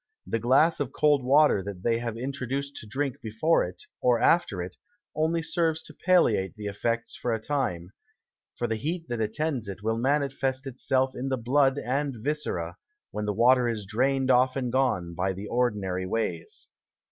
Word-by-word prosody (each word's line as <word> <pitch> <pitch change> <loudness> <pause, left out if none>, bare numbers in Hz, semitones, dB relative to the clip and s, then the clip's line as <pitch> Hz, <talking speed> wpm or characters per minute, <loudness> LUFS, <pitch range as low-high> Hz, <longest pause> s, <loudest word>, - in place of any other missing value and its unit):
The 115 - -1
Glass 135 +8 +4
of 140 -3 -2
cold 145 -2 +3
Water 140 -4 +5
that 95 -1 -7
they 115 -1 +2
have 115 -1 -4
introduced 135 +2 -3
to 110 - -8
drink 135 +3 -3
before 115 +10 +2
it, 90 +1 -7 0.2
or 120 -2 +3
after 140 - +3
it, 90 0 -8 0.4
only 160 +2 +1
serves 160 -1 0
to - - -11
palliate 140 - +2
the 105 -1 -8
Effects 115 +3 -2
for 120 - -2
a - - -4
Time; 100 -10 -2 0.6
for 120 - -2
the 110 -1 -1
Heat 165 +7 -3
that 120 -2 -2
attends 125 +1 -1
it, 100 +1 -7
will 110 +1 0
manifest 135 0 0
itself 130 0 0
in 135 +2 -3
the 130 - 0
Blood 135 +3 +2
and 140 +1 -1
Viscera, 110 - -2 0.3
when 105 - -3
the 105 - 0
Water 120 +3 +4
is 110 -3 -3
drain'd 130 +5 +1
off 130 +1 +4
and 125 -3 -2
gone, 120 -10 +1
by 95 +3 -1
the 95 +3 -7
ordinary 100 -6 -1
ways. 90 -6 -3
125 Hz, 180 wpm, -27 LUFS, 105-140 Hz, 0.6 s, Water